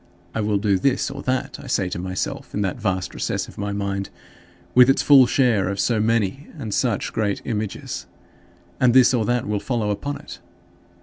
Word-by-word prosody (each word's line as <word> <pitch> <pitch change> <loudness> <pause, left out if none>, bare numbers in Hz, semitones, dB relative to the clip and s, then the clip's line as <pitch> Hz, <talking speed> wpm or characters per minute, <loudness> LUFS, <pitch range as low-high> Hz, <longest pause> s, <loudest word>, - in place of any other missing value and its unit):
"I 110 - -1
will 105 -1 +1
do 100 -2 +1
this 135 +5 +1
or 140 0 -7
that" 130 -1 -2
I - - -11
say 100 -7 0
to 90 - -4
myself 95 +1 -4
in 105 - 0
that 100 +5 -3
vast 95 -3 -1
recess - - -2
of - - -13
my 100 0 -2
mind, 100 -1 -3 0.6
with 125 +1 +7
its 135 - +3
full 135 -4 +7
store 120 -9 +2
of 100 0 -3
so 115 0 +1
many 115 +4 0
and 110 -8 -5
such - - 0
great 105 -3 0
images 110 -4 -4 0.7
"and 125 -1 +4
this 130 0 +6
or 115 -4 +1
that 120 -1 0
will 105 -1 0
follow 110 -3 -1
upon 140 +8 -3
it." 90 -9 -11
110 Hz, 195 wpm, -22 LUFS, 100-125 Hz, 0.7 s, with